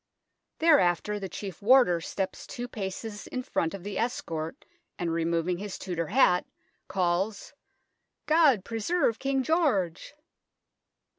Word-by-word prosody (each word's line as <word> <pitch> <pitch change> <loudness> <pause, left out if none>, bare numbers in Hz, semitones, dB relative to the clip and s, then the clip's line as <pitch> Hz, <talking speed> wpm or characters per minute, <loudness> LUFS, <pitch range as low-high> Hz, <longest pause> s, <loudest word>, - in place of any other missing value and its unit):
Thereafter 210 - +3
the 195 -1 -5
Chief 190 -3 -7
Warder 215 -7 +5
steps 190 +2 -4
two 245 -2 -5
paces 205 0 -6
in 255 - -4
front 165 -6 -1
of 190 - -9
the 205 0 -4
escort, 165 -9 -3 0.3
and, 170 -2 -2
removing 170 +1 0
his 205 -1 -5
Tudor 170 -3 -3
hat, 190 -6 +3 0.4
calls 190 +3 -1 0.4
" - - -51 0.3
God 300 - +4
preserve 230 +2 0
King 270 -1 0
George 265 - 0
200 Hz, 125 wpm, -28 LUFS, 175-250 Hz, 0.4 s, Warder